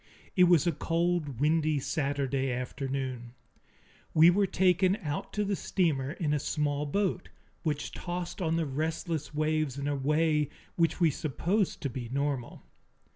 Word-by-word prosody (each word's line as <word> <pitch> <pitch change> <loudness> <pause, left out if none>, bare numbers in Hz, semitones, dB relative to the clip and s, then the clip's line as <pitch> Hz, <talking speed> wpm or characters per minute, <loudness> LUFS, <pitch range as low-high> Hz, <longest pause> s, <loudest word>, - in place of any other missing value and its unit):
It 180 - +7
was 175 -2 +5
a 170 - +3
cold, 165 -4 -1
windy 155 0 +2
Saturday 140 -2 -1
afternoon. 125 -1 -4 0.8
We 165 +2 +8
were 200 +2 +2
taken 185 +1 +3
out 145 0 -3
to 210 0 0
the 200 0 0
steamer 150 -9 0
in 155 -5 -1
a 150 - +1
small 145 0 -1
boat, 185 +2 -1 0.3
which 150 -3 -2
tossed 175 +1 -5
on 165 -2 +1
the 165 -1 +1
restless 155 +2 -2
waves 155 -3 0
in 140 0 -3
a 145 - 0
way 150 +1 +2 0.3
which 165 0 +1
we 165 -3 +4
supposed 175 - -1
to 140 - 0
be 120 -2 -5
normal. 140 -2 -2
155 Hz, 150 wpm, -29 LUFS, 140-170 Hz, 0.8 s, We